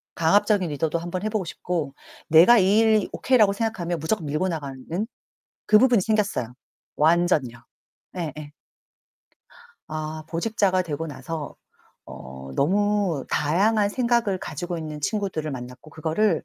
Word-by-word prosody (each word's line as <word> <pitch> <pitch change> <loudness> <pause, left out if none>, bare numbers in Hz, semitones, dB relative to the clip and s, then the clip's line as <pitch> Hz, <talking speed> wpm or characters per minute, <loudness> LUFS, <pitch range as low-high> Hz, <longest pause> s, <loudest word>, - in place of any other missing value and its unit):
강압적인 190 +2 +2
리더도 155 +3 -1
한번 175 +3 -5
해 215 - 0
보고 215 -2 -1
싶고, 165 -4 -4 0.3
내가 175 +10 +7
이 195 +2 +4
일이 220 -2 +3
오케이라고 230 -6 +3
생각하면 200 -5 -2
무조건 160 +1 -2
밀고 155 +6 0
나가는 140 -6 -5 0.8
그 215 - +7
부분이 240 -2 +4
생겼어요. 205 - -1 0.4
완전요. 155 -7 +2 0.5
예예. 150 -3 -6 1.4
아. 155 0 -5
보직자가 185 +2 +1
되고 160 -1 -4
나서 145 +1 -6 0.5
어 65 +1 -10
너무 200 -2 +1
다양한 200 +8 +2
생각을 235 -5 +1
가지고 175 -1 -5
있는 155 -2 -6
친구들을 185 -4 -2
만났고 125 +3 -9
그거를 160 +4 0
170 Hz, 300 characters per minute, -24 LUFS, 155-205 Hz, 1.4 s, 내가